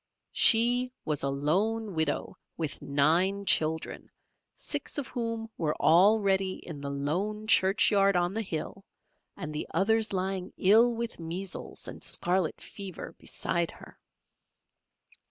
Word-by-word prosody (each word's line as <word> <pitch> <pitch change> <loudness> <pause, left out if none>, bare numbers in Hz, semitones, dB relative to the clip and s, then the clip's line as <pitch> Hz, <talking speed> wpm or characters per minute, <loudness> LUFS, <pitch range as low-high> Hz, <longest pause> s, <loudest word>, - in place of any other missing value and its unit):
She 245 +2 +5
was 150 -3 -1
a 140 - -1
lone 195 +10 0
widow 160 +3 -1 0.2
with 160 -3 -4
nine 170 +8 +1
children, 160 -2 +1 0.5
six - - -3
of 285 - -3
whom 230 -2 -3
were 155 -2 -1
already 195 +2 +4
in 155 -6 -9
the 140 - -4
lone 180 +10 -2
churchyard 195 -1 +4
on 175 +1 +1
the 225 - -1
hill, 190 0 -5 0.5
and 150 - -6
the 150 - -4
others 220 +5 +2
lying 190 0 -3
ill 230 +5 +5
with 235 -3 -5
measles 175 +3 -6
and - - -9
scarlet 180 -2 -1
fever 190 -4 -7
beside 170 -1 -2
her. - - -14
190 Hz, 125 wpm, -28 LUFS, 160-215 Hz, 0.5 s, She